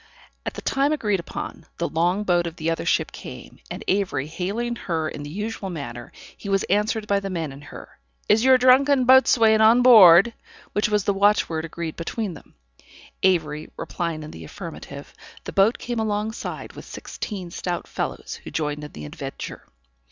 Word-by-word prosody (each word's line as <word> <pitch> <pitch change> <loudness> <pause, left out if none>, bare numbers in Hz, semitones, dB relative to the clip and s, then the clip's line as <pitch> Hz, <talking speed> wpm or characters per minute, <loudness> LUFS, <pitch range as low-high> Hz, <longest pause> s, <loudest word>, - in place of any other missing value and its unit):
At - - -3
the - - -7
time 275 +2 +1
agreed 210 -10 0
upon, 170 -1 -7
the 170 - -1
long 175 +5 +1
boat 175 -3 +2
of 165 - -7
the 165 -1 -1
other 165 - -3
ship - - +1
came, - - -10
and - - -6
Avery 190 -8 0
hailing 200 +10 -3
her 165 -8 -2
in 150 - -6
the 145 - -7
usual 205 +3 -4
manner, 120 -8 -7 0.2
he 200 - -8
was 195 -1 +2
answered 210 +2 +1
by 200 -1 +1
the 195 0 -5
men 165 -6 -3
in 135 +1 -11
her, 145 - -12 0.3
"Is 220 +2 +4
your 260 0 +7
drunken 260 +1 +5
boatswain 230 -4 +6
on 230 +3 +6
board?" 210 -3 +8 0.4
which 210 +1 +1
was 210 -2 +1
the 200 - +1
watchword 195 -5 +2
agreed 165 0 -6
between 195 +3 -3
them. 160 - -15 0.7
Avery 155 -5 +1
replying 165 -3 -4
in 150 - -9
the 80 - -10
affirmative, 75 - -9 0.3
the - - -7
boat 200 +4 +4
came 240 -1 -4
alongside 215 +1 -3
with - - -10
sixteen 185 -5 -7
stout 175 0 -3
fellows, - - -5
who - - -8
joined 150 -1 -3
in 150 - -9
the 75 - -8
adventure. 75 - -7
195 Hz, 180 wpm, -23 LUFS, 165-220 Hz, 0.7 s, board